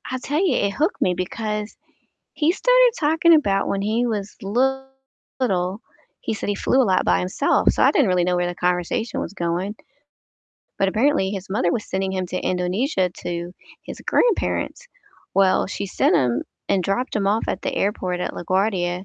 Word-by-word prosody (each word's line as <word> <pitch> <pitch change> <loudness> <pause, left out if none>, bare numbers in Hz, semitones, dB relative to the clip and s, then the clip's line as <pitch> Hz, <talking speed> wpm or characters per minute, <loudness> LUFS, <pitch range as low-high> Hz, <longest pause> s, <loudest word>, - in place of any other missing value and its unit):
I 255 - -2
tell 295 +4 -1
you, 365 - +2
it 200 0 +1
hooked 315 - -1
me 180 - +3
because 210 +3 -4 0.6
he 315 +2 +2
started - - +4
talking 325 +2 +4
about 200 -10 +1
when 195 - -1
he 220 +4 0
was 210 -2 -3
little, 255 -4 -2 0.4
he - - -2
said 215 - -5
he 205 - 0
flew 260 +6 +2
a - - +4
lot 185 - +2
by 90 0 +3
himself, 90 +1 +1
so - - +1
I - - +6
didn't - - +3
really 180 -1 +2
know 180 0 +1
where 175 0 0
the 175 - -4
conversation 180 +7 -1
was - - -5
going 180 +3 -2 1.0
but 195 - +2
apparently 220 -1 +2
his 195 -1 -6
mother 175 -3 +1
was 215 - -2
sending 190 0 -2
him 185 -1 -2
to 185 - -4
Indonesia 185 - 0
to 175 0 -5 0.3
his - - -9
grandparents. - - 0 0.5
Well, 195 -1 +3
she 200 0 -4
sent - - +2
him 120 -2 +1 0.3
and 190 -2 +2
dropped 230 +8 -1
him 200 -2 0
off 210 +3 +1
at 185 - -2
the - - -2
airport 185 -3 -1
at - - -2
LaGuardia, 185 0 -1
195 Hz, 185 wpm, -22 LUFS, 180-245 Hz, 1.0 s, I